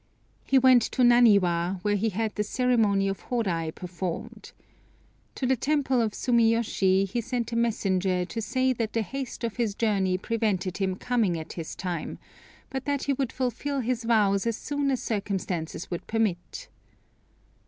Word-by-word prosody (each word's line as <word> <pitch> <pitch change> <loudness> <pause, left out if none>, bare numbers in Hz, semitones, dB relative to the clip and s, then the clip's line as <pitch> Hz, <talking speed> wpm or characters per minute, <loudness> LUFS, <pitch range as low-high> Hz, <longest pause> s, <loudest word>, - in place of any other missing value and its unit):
He 270 - +4
went 255 -1 +6
to 255 - +2
Naniwa, 200 -7 +4
where 205 - +1
he 215 +3 +1
had 220 +2 -2
the 210 - -1
ceremony 215 -4 +2
of 195 0 -2
Horai 185 -10 -1
performed. 180 +1 -6 0.8
To 265 - -2
the 260 +1 +3
temple 270 -1 +1
of 220 -2 -1
Sumiyoshi 225 -5 +2
he 235 +5 -2
sent 240 0 -3
a - - -2
messenger 190 -6 +1
to 225 +5 -5
say 255 +3 +1
that 225 -3 -3
the 225 - +1
haste 270 +2 -6
of 230 -1 -3
his 225 -4 0
journey 195 -5 +1
prevented 195 -4 -1
him 190 -2 -1
coming 215 -5 0
at 160 - -7
this 165 -2 -6
time, 180 -4 -4 0.5
but 265 0 -4
that 285 -1 -1
he 280 - +1
would 270 -2 -2
fulfil 265 +2 -2
his 245 0 -2
vows 210 -3 +2
as 230 -1 -1
soon 285 -1 -2
as 260 -2 -1
circumstances 190 -6 -3
would 175 - -5
permit. 225 - -2
225 Hz, 165 wpm, -27 LUFS, 190-245 Hz, 0.8 s, went